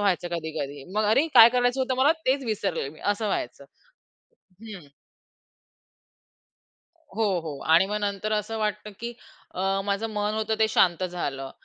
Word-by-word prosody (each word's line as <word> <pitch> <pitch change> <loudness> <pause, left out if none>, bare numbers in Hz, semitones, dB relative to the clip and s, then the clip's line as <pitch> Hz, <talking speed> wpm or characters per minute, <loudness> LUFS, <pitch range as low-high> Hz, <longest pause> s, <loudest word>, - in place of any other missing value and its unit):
व्हायचं 185 -3 0
कधी-कधी. 150 -4 -5
मग 215 0 +1
अरे! 245 +9 +3
काय 230 -1 +10
करायचं 245 +1 +1
होतं 260 0 0
मला, 295 +4 +5
तेच 270 +1 +1
विसरले 210 - -2
मी, 155 +2 -13
असं 205 +1 0
व्हायचं. 140 -7 -3 1.0
हं. 200 -8 -10 2.3
हो, 225 - +1 0.2
हो. 155 -3 -7
आणि 170 +4 +6
मग 210 +1 -2
नंतर 205 +1 -2
असं 215 +1 -2
वाटतं, 210 0 -3
की 235 +1 -4 0.4
अ, 195 +1 0
माझं 200 +2 -1
मन 210 0 -1
होतं 220 0 -1
ते 220 - +4
शांत 180 -4 +2
झालं. 140 -7 -4
205 Hz, 150 wpm, -25 LUFS, 175-220 Hz, 2.3 s, काय